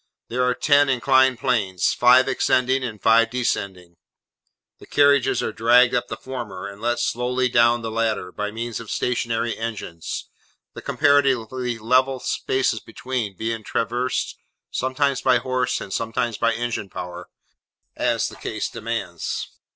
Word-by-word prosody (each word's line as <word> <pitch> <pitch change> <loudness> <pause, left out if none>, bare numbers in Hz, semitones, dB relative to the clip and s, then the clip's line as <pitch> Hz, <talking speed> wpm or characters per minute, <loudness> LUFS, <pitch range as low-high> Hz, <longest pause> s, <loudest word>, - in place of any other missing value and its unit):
There 125 +2 0
are 125 0 +2
ten 145 0 +4
inclined 130 0 +3
planes; 105 -9 0
five 125 +2 +5
ascending, 130 0 +1
and 110 -4 -5
five 115 +1 +4
descending; 95 -8 -3 0.8
the - - -14
carriages 140 -2 +3
are - - -2
dragged 120 +2 +5
up 125 - 0
the - - -6
former, 115 -8 -7
and 100 +1 -11
let 120 +1 0
slowly 125 +2 0
down 120 -1 +3
the 110 - -3
latter, 110 -5 -1
by 105 +2 -3
means 115 +1 -5
of 115 -2 -10
stationary 115 -1 -1
engines; 105 -8 -5 0.5
the - - -8
comparatively 130 -4 +1
level 130 +4 +2
spaces 130 -3 0
between, 115 -2 -4
being 115 0 -3
traversed, 120 +4 -2 0.3
sometimes 130 +1 0
by 130 -1 +4
horse, 130 +1 -1
and 95 - -7
sometimes 115 0 -1
by 115 +2 +1
engine 115 -3 -3
power, 90 -1 -7 0.7
as - - 0
the - - -10
case 110 - -4
demands. 110 -7 -4
120 Hz, 145 wpm, -23 LUFS, 110-130 Hz, 0.8 s, five